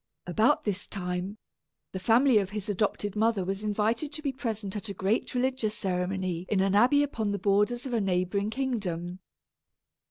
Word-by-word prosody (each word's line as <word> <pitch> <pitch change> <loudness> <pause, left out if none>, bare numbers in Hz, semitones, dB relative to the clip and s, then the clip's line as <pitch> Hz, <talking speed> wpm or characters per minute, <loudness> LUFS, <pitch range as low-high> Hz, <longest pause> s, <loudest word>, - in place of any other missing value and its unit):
About 220 - +2
this 205 -2 -2
time, 180 +1 -4 0.5
the 190 - -4
family 235 +4 +5
of 195 -2 -2
his 210 0 -5
adopted 205 0 -1
mother 215 -3 +2
was 195 +2 -3
invited 220 +7 0
to 305 - -5
be 280 - 0
present 220 -6 -4
at 210 +1 -5
a 200 - -5
great 195 +7 0
religious 250 -4 0
ceremony 185 -1 -2
in 205 - +2
an 195 0 +2
abbey 255 +8 +5
upon 225 -7 -2
the 200 - -1
borders 205 +6 +1
of 260 - -4
a 230 - +2
neighboring 190 +2 0
kingdom. 195 -9 -3
205 Hz, 170 wpm, -28 LUFS, 190-230 Hz, 0.5 s, family